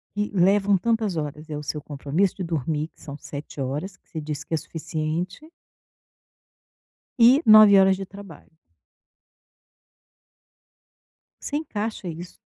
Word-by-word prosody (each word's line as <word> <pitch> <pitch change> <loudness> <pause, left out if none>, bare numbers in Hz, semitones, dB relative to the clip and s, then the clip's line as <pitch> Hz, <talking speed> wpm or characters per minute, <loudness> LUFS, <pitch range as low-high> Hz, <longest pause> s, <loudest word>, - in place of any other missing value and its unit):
que 210 0 -1
levam 195 +2 +3
tantas 220 -1 0
horas, 150 0 -5
é 150 - -3
o 150 - -6
seu 150 +1 -4
compromisso 150 +6 -1
de 190 - -4
dormir, 155 -1 -2
que - - -28
são 140 -1 -8
7 145 0 -8
horas, 150 +9 -4
que - - -41
você 160 - -6
disse 150 -1 -6
que - - -3
é - - +3
suficiente 165 - -4 1.8
e - - +9 0.2
9 215 -2 +9
horas 190 0 +4
de 195 - -6
trabalho. 190 -5 -13 2.8
Você 290 - -4
encaixa 220 - -4
isso. 170 +2 -8
175 Hz, 135 wpm, -24 LUFS, 150-200 Hz, 2.8 s, e